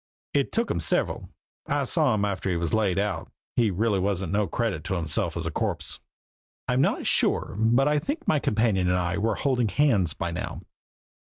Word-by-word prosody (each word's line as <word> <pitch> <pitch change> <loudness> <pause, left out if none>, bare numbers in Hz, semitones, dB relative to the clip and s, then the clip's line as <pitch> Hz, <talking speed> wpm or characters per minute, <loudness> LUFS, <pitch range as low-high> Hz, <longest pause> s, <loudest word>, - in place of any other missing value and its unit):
"It 140 -2 +1
took 230 +1 0
him - - -1
several. - - 0 0.4
I - - +1
saw 150 -9 +2
him 105 -1 +1
after 100 -1 -2
he 90 - 0
was 85 -2 -2
laid 105 -4 +2
out. 100 -5 -2 0.2
He 115 -3 +3
really 100 +1 +1
wasn't 95 -2 -1
no 105 0 +1
credit 115 +3 -2
to 95 0 -1
himself 80 -4 -1
as - - -3
a - - -2
corpse." - - -2 0.7
I'm 125 +1 +2
not - - +1
sure, - - +2
but 120 +5 +3
I 150 0 +3
think 290 - -4
my 155 - +3
companion 105 -6 +1
and 90 - +2
I 90 +1 -1
were 110 +1 +1
holding 125 -4 +1
hands 110 - +2
by 85 -3 -3
now. 85 - -5
105 Hz, 195 wpm, -26 LUFS, 95-125 Hz, 0.7 s, He